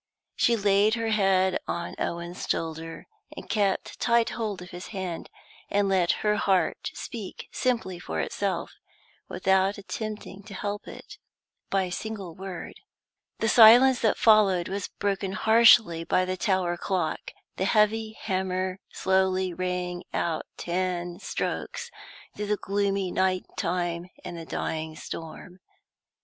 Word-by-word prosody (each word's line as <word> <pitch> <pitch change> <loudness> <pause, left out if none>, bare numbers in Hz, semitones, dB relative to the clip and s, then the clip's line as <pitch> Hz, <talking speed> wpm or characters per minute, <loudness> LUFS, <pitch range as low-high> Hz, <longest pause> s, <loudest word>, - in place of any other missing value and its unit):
She 235 - +3
laid 205 +1 +3
her 230 -1 -1
head 195 -3 +3
on 170 0 -3
Owen's 170 +1 -4
shoulder, 165 0 -3 0.3
and - - -8
kept 200 -3 0
tight 235 -1 +3
hold 215 -4 -3
of 180 - -12
his 175 +1 -8
hand, 185 -5 -5 0.4
and 200 0 +2
let 185 -3 +3
her 210 0 +3
heart 190 -2 +1
speak 215 -6 -7
simply 225 -8 -1
for - - -4
itself, 195 -3 -2 0.6
without 190 +1 +2
attempting 210 -1 -6
to 200 - -9
help 205 +1 -4
it - - -11 0.5
by 195 -1 +2
a 180 - -4
single 200 -3 -5
word. 185 0 -8 0.6
The 225 - +2
silence 245 +3 +8
that 220 - +2
followed 200 -6 +4
was 195 0 -3
broken 195 -1 -2
harshly 220 -5 +5
by 185 +2 +2
the 185 0 -2
tower 185 -3 0
clock. 180 -3 -2 0.3
The 190 - 0
heavy 215 +1 +2
hammer 185 -1 -1
slowly 190 -1 +1
rang 180 0 -3
out 165 -2 -1
ten 175 0 -2
strokes - - -4 0.4
through 210 - -4
the 210 0 +1
gloomy 200 -2 -1
night 185 -1 +1
time 175 0 -2 0.2
and 175 - -6
the 165 -1 -7
dying 160 0 -3
storm. 170 +4 -8
190 Hz, 135 wpm, -27 LUFS, 180-210 Hz, 0.6 s, silence